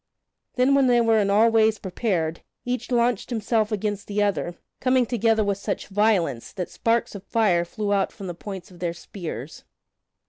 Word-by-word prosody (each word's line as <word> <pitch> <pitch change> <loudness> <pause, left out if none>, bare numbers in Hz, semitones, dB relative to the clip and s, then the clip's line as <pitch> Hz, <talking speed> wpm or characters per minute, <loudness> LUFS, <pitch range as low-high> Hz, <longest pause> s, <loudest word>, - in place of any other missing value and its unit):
Then 255 +2 +3
when 275 -1 +4
they 245 -1 +4
were 225 -1 +4
in 200 -1 +1
all 220 +3 +5
ways 220 -1 +4
prepared, 180 -4 -2 0.2
each 245 -1 -3
launched 240 -3 +1
himself 220 -1 0
against 205 -1 -2
the 205 0 0
other, 190 -4 -1 0.2
coming 255 -1 +3
together 225 -2 +2
with 200 -1 -1
such - - -4
violence 195 - +1
that 180 -3 -5
sparks 230 0 0
of 200 -2 -8
fire 200 -5 +2
flew 205 +4 -2
out 195 -1 +1
from 200 - -9
the 175 - -4
points 190 +2 -8
of 175 - -15
their 170 -1 -2
spears. 160 - -8
210 Hz, 180 wpm, -24 LUFS, 190-230 Hz, 0.2 s, all